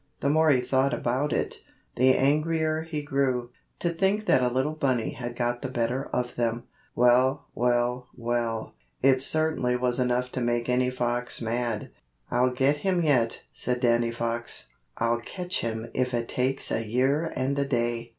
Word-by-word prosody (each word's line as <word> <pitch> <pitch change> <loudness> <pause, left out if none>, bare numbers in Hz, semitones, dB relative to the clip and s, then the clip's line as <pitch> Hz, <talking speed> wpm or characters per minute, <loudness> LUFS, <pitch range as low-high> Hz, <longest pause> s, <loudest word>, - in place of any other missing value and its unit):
The 140 - +2
more 160 +1 +4
he 130 -4 +4
thought 130 +1 +1
about 130 +5 -1
it, - - -2 0.3
the 130 +1 +4
angrier 155 +3 +1
he 160 -2 -4
grew. 130 -4 0 0.3
To 175 - +1
think 195 +5 +1
that 130 - +4
a 125 - +3
little 130 +5 0
bunny 130 -7 0
had 120 -1 -6
got 120 0 -1
the 130 - -3
better 125 +2 -1
of 125 0 -1
them! 120 0 0 0.3
Well, 125 +3 +4
well, 125 +1 +1
well! 115 -1 -2 0.3
It 130 -1 +5
certainly 155 -4 0
was 125 0 0
enough 125 0 0
to 130 - -3
make 120 0 0
any 125 0 +2
fox 125 -1 -2
mad. 115 -1 -2 0.4
"I'll 125 +1 +3
get 135 +3 +2
him 180 +2 +1
yet," 125 -7 +2
said 125 0 -1
Danny 120 -1 +2
Fox. 115 0 -3 0.3
"I'll 115 0 +1
catch 180 +9 -3
him 115 0 -4
if 125 -1 0
it 115 -1 -2
takes 130 +2 -1
a 115 - 0
year 135 +8 +1
and 135 +2 0
a 140 - +1
day!" 120 -3 -1
125 Hz, 170 wpm, -27 LUFS, 120-140 Hz, 0.4 s, It